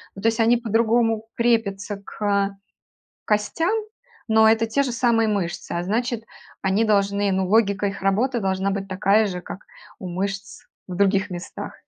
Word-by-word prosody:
Ну, 195 - -9
то - - +3
есть 225 - -3
они 230 +2 +4
по-другому 225 -1 +1
крепятся 210 -4 0
к 200 -1 -1 0.7
костям, 215 - 0 0.5
но 220 -1 +5
это 225 0 +3
те 225 +5 0
же 260 - -2
самые 230 -2 +2
мышцы, 190 -5 -3
а 170 - -2
значит, 230 +4 -2 0.4
они 195 +4 +2
должны, 200 -1 +2
ну, 190 0 0
логика 205 0 +2
их 200 -1 -3
работы 230 +6 +1
должна 190 -1 0
быть 195 0 -3
такая 195 +3 +2
же, 180 -2 -5
как 180 - -8 0.4
у 185 - -6
мышц 195 +3 -4 0.3
в 180 - -6
других 195 0 +2
местах. 175 -1 -7
205 Hz, 160 wpm, -23 LUFS, 195-225 Hz, 0.7 s, но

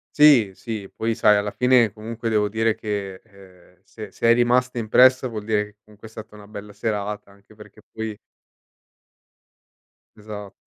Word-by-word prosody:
Sì, 140 -9 +6
sì. 110 -4 -6
Poi, 115 0 -2
sai, 105 -1 +4
alla 105 0 -2
fine 125 -4 +3
comunque 115 +2 -6
devo 105 -1 +1
dire 110 +1 0
che, 100 -4 -5
ehm, 95 -3 -20
se 105 -3 -10
se 115 - -1
è 115 - +7
rimasta 125 +1 +1
impressa 130 +3 +4
vuol 105 -3 -7
dire 105 -1 0
che 105 0 -20
comunque 105 +1 -15
è - - -21
stata 110 -1 -11
una 105 -1 -14
bella 105 -1 -10
serata 105 -1 -4
anche 100 +2 -21
perché 105 0 -16
poi 110 -2 -6 2.0
Esa 105 -2 -9
105 Hz, 165 wpm, -22 LUFS, 105-115 Hz, 2.0 s, è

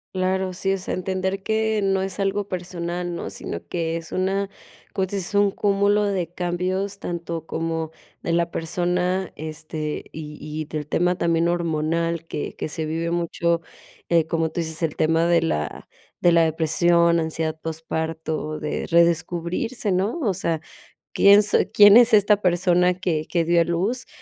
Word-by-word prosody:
Claro. 185 0 0
Sí, 195 +2 -1
o - - -1
sea, 185 - -3
entender 190 +1 -2
que 220 0 0
no 195 -1 +1
es 195 +1 -4
algo 195 +1 0
personal, 175 -1 -4
¿no?, 170 - -5
sino 95 -3 -7
que 165 -1 -2
es 165 -1 -6
una, 195 +1 0 0.5
pues 190 0 -1
es 195 0 -3
un 205 -1 +4
cúmulo 200 +1 +2
de 185 -4 -2
cambios 185 +3 -2
tanto 170 -2 -5
como 160 -1 -3 0.3
de 170 - -1
la 170 0 +1
persona, 180 +3 -1
este, 155 0 -5
y 150 -1 -8
y 155 +1 -5
del 150 -1 -5
tema 175 +3 +1
también 170 -1 +1
hormonal, 165 0 -1
que 150 - -5
que - - -4
se 155 0 -3
vive 165 +2 -2
mucho, 170 0 0 0.5
eh, 170 -2 +4
como 165 0 0
tú 170 - -3
dices, 160 0 -5
el 160 -3 -1
tema 165 +1 +2
de 170 -1 +3
la 75 - -3 0.3
de 175 - +5
la 170 0 +5
depresión, 170 +2 +3
ansiedad 160 0 -2
posparto, 160 -1 -3
de 150 - -3
redescubrirse, 170 +6 +1
¿no? 195 - 0
O 215 -8 +1
sea, 170 -3 -1 0.5
quién 200 +1 +7
soy 210 - +2
quién 205 +1 +8
es 245 -1 +6
esta 205 0 +4
persona 180 0 +3
que 165 -4 -1
que 170 -2 0
dio 170 0 +4
a - - +5
luz, 185 +9 -1
170 Hz, 165 wpm, -23 LUFS, 160-190 Hz, 0.5 s, quién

